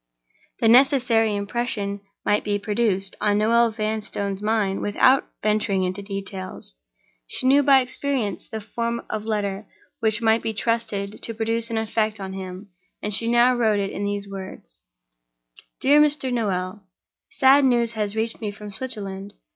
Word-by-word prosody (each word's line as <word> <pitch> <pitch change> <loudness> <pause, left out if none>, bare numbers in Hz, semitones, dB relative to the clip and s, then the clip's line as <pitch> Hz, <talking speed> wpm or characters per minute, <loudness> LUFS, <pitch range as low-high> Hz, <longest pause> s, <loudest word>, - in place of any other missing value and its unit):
The 225 - +4
necessary 240 -3 +4
impression 205 -1 -3 0.2
might 205 - +2
be 205 -1 0
produced 205 -2 -1
on 205 -1 +2
Noel 230 +2 +4
Vanstone's 215 -2 -3
mind 210 -2 0
without 255 +6 +3 0.2
venturing 210 -2 +1
into 185 +2 -2
details. 195 - -5 0.5
She - - -2
knew 275 +2 +6
by 275 -1 +6
experience 255 -5 -3
the 220 -1 -5
form 235 +2 -3
of 215 0 -3
letter 205 -2 -2 0.3
which 220 -1 +1
might 225 0 +3
be 225 -1 -3
trusted 215 -3 -2
to 230 - -4
produce 225 +1 -1
an 225 - -2
effect 220 -1 -1
on 190 -1 -6
him, 190 +1 -8 0.3
and 210 - -2
she 230 +3 +1
now 240 +1 +5
wrote 220 -4 +2
it 195 -1 -2
in 200 - -4
these 205 0 -3
words: 190 - -9 1.0
"DEAR 290 +3 +6
MR. 290 -4 +1
NOEL—Sad 205 +6 0
news 240 -3 +3
has 210 -2 -3
reached 225 +1 -2
me 215 - -2
from 205 0 -9
Switzerland. 200 -4 -5
215 Hz, 150 wpm, -23 LUFS, 200-235 Hz, 1.0 s, knew